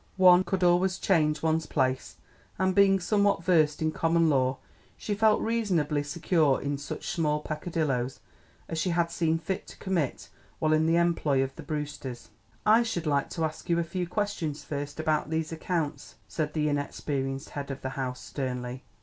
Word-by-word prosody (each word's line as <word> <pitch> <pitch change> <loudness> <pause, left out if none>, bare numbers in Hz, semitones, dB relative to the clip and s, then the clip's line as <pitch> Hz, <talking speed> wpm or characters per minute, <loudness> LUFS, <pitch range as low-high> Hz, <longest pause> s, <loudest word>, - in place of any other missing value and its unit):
One 180 -1 +7
could 190 -1 -1
always 180 +1 +3
change 155 -6 +1
one's 160 0 +1
place, 130 -2 -1 0.4
and 190 +1 +2
being 195 0 +5
somewhat 200 -1 +2
versed 160 -4 +3
in 155 - +1
common 165 0 +2
law, 130 -2 +2 0.4
she 210 - -3
felt 215 +1 +4
reasonably 185 -11 +1
secure 150 -1 +1
in 140 0 -3
such 145 - -6
small 150 -3 +1
pecadilloes 150 -5 -2 0.5
as 165 - -3
she 185 - 0
had 170 -1 +1
seen 165 -1 +1
fit 185 +5 -4
to - - -12
commit 175 -9 -2 0.3
while 155 0 +2
in 155 +1 +3
the 165 - +3
employ 160 -6 +2
of 135 0 -5
the - - -8
Brewsters. 145 -5 -5 0.4
"I 220 +2 +6
should 200 -8 -2
like 140 -2 +1
to 165 -2 -1
ask 155 +2 -6
you 170 - +3
a 170 - +2
few 180 +2 -3
questions 180 -6 -2
first 145 0 -5
about 155 -1 0
these 160 0 -1
accounts," 160 -3 -3
said 150 -2 -3
the 150 -1 +1
inexperienced 140 -1 -2
head 145 -1 -5
of 135 0 -6
the 130 - -2
house 130 -1 -4
sternly. 125 -1 -4
160 Hz, 175 wpm, -28 LUFS, 145-175 Hz, 0.5 s, One